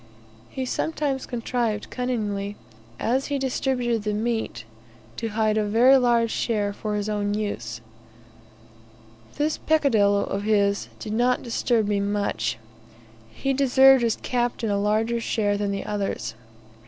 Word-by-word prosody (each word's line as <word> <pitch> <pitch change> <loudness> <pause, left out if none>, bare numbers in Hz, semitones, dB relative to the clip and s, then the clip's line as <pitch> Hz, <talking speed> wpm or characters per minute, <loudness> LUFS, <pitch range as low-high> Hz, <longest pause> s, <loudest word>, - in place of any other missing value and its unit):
He 265 - -4
sometimes 280 -1 -2
contrived 230 -3 -2
cunningly, 210 -5 -2 0.4
as 260 +4 0
he 285 - -1
distributed 250 -3 0
the 210 0 -2
meat, 220 - -2 0.5
to 230 - -2
hide 215 0 +1
a - - +1
very 235 +6 +5
large 235 -2 +2
share 205 -3 -1
for 210 +1 -3
his 205 0 -2
own 205 -1 -1
use. 120 - -4 1.6
This 300 +2 0
peccadillo 220 -10 +3
of 200 - -3
his 200 -1 +1
did 210 - -6
not 245 +2 +2
disturb 230 -2 0
me 205 -1 +1
much; 200 - -1 0.7
he 270 - -2
deserved 265 -1 +5
as 230 -2 +2
captain 240 -3 -1
a 200 - +1
larger 220 +3 +1
share 205 -2 0
than 205 0 -1
the 200 0 -3
others. 195 - -3
220 Hz, 135 wpm, -24 LUFS, 205-250 Hz, 1.6 s, very